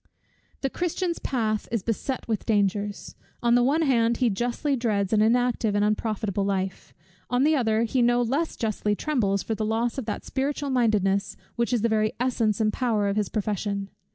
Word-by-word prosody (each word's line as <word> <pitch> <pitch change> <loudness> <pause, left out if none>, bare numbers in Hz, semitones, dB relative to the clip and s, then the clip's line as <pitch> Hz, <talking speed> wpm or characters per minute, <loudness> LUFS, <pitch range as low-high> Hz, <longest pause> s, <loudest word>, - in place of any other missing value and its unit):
The 270 - 0
Christian's 355 0 -2
path 220 -4 -1
is 230 -5 -1
beset 245 +3 -3
with 220 -3 -2
dangers 205 -1 0 0.3
On 235 0 +4
the 245 - +5
one 290 +6 +2
hand, 235 -5 +2
he 245 -3 +2
justly 245 +7 -1
dreads 215 -5 0
an 210 - +4
inactive 230 -1 +2
and 205 0 +3
unprofitable 210 -2 -1
life; 195 -1 -2 0.4
on 250 +1 +2
the 310 +2 +4
other, 225 -4 +2
he 245 +2 +1
no 240 0 +3
less 280 +8 -1
justly 210 -2 -1
trembles 205 -9 0
for 225 - -2
the 220 - -3
loss 225 +4 0
of 255 - -5
that 210 - -4
spiritual 280 +1 -2
mindedness, 210 -5 +1 0.2
which 235 +1 0
is 240 -3 +1
the - - +4
very 215 -1 +1
essence 235 -4 +1
and 215 -1 +1
power 220 -5 +1
of 200 - -1
his 210 -2 0
profession. 200 -1 -2
225 Hz, 185 wpm, -25 LUFS, 210-245 Hz, 0.4 s, the